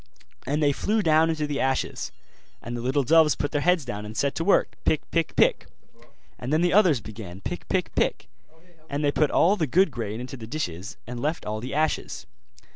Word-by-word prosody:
And 150 +3 0
they 145 - +4
flew 210 +9 0
down 160 0 +4
into 155 -2 -1
the 145 -1 -3
ashes; 130 - -1 0.5
and 120 - -6
the 120 - -4
little 135 +3 +1
doves 155 +2 +5
put 145 - -2
their 145 - 0
heads 175 -3 +2
down 105 -4 -5
and 105 +1 -8
set 140 -1 +1
to 165 - -2
work, 195 - +2
pick, 155 - +2
pick, 165 -1 0
pick; - - +3 0.7
and 125 +2 -5
then 155 +2 +3
the 175 - +2
others 180 - +4
began 105 -4 -9
pick, - - -6
pick, - - -1
pick; - - 0 0.6
and 145 +2 -2
they 145 - +3
put 150 +1 +2
all 190 +5 +4
the 160 -5 0
good 185 +5 +3
grain 115 -3 -4
into 125 +2 -7
the 110 -2 -9
dishes, 95 - -5
and 120 +1 -6
left 155 +3 -2
all 110 +1 -3
the 125 +5 -5
ashes. 155 +1 -1
145 Hz, 210 wpm, -25 LUFS, 120-160 Hz, 0.7 s, doves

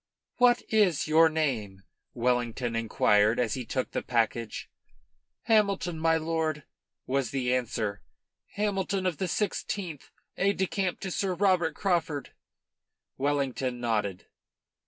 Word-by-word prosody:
"What 245 -1 +4
is 200 -10 +3
your 160 +1 +6
name?" 115 -12 -2 0.3
Wellington 120 -1 0
inquired, 110 -1 +3
as 120 -3 +1
he 130 -2 -4
took 130 - -2
the - - -2
package. 115 -1 -1 0.8
"Hamilton, 200 -6 +2
my 165 0 +3
lord," 160 -2 -1 0.4
was 135 -1 0
the 125 -2 0
answer; 110 -5 -2 0.5
"Hamilton 200 -2 -1
of 180 -5 0
the 190 - 0
Sixteenth, 180 -4 -3 0.3
aide 200 +2 +2
de 190 - +2
camp 190 -1 -2
to 190 - -4
Sir 185 0 -1
Robert 180 -4 +2
Craufurd." 165 -7 -1 0.9
Wellington 135 -3 -1
nodded. 105 -6 -1
155 Hz, 120 wpm, -28 LUFS, 120-185 Hz, 0.9 s, your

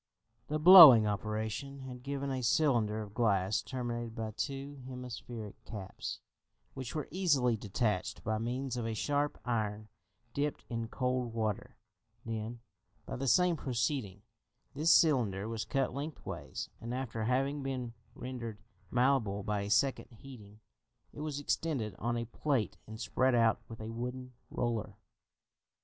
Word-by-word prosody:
The 150 - -1
blowing 155 - +11
operation 110 +6 -3
had 125 -2 -8
given 140 +1 -3
a 130 -1 -2
cylinder 115 -5 +2
of 100 -1 -11
glass 100 -4 +2
terminated 120 -3 -4
by 110 -1 -3
two 140 +4 -5
hemispheric 120 -4 -7
caps, 100 -4 -6 0.5
which 130 0 -6
were 150 -3 -2
easily 145 -10 +2
detached 105 -2 -2
by 110 0 -1
means 125 +3 -2
of 120 -2 -2
a 110 - -2
sharp 145 +5 0
iron 110 -3 -2 0.4
dipped 145 +1 -2
in 115 -1 -2
cold 125 -1 -1
water; 110 -3 -2 0.5
then, 115 +1 -4 0.4
by - - -5
the 135 +2 -3
same 180 +5 +4
proceeding, 120 - -2 0.5
this 155 +4 +3
cylinder 110 - +4
was 115 -1 -3
cut 135 -3 0
lengthways, 145 +3 -5
and 115 +2 -4
after 115 -4 -3
having 135 +4 +1
been 130 -3 -3 0.2
rendered 120 -4 -6 0.3
malleable 120 -6 +2
by 105 0 -1
a 100 - -4
second 135 +6 +2
heating, 110 -4 -13 0.5
it - - -10
was 150 -2 -3
extended 140 - -1
on 120 +1 -1
a 115 - -2
plate 125 0 -1
and 110 0 -8
spread 130 +2 +2
out 115 -1 +3
with 115 - -9
a 110 +1 -5
wooden 125 +2 -5 0.2
roller. 115 -4 -2
120 Hz, 140 wpm, -32 LUFS, 110-135 Hz, 0.5 s, blowing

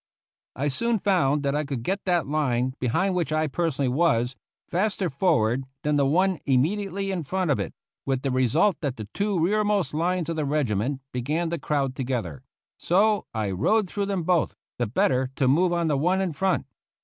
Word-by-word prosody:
I 140 - -1
soon 230 - +1
found 160 -8 +2
that 140 -1 0
I 150 - 0
could 135 -5 -4
get 195 +8 -2
that 175 -3 +2
line, 130 -4 0
behind 185 +11 +1
which 170 -5 -1
I 155 0 +1
personally 150 -2 -1
was, 125 -3 +1 0.3
faster 190 0 0
forward 135 - +2 0.2
than 150 0 +1
the 140 -1 +3
one 185 +4 +2
immediately 195 +8 0
in 185 -3 -2
front 180 +2 -1
of 135 - +1
it, - - -3 0.3
with 135 -1 -1
the 135 - 0
result 130 - +2
that 140 -5 -2
the 110 -2 -7
two 200 -2 0
rearmost 205 -2 +1
lines 175 +2 0
of 165 -1 -3
the 155 - 0
regiment 135 -2 0
began 150 +7 -1
to 170 - -2
crowd 140 -3 -1
together; 120 - -3 0.4
so 205 +4 +2
I 110 -3 -2
rode 205 - +2
through 200 +2 -2
them 195 -4 -1
both, 175 -1 +1 0.2
the 120 - +1
better 130 +3 +1
to 130 - +1
move 175 +7 +3
on 170 -1 +1
the 150 -3 +1
one 180 +7 +2
in 190 -4 -1
front. 190 +5 0
155 Hz, 190 wpm, -25 LUFS, 130-185 Hz, 0.4 s, the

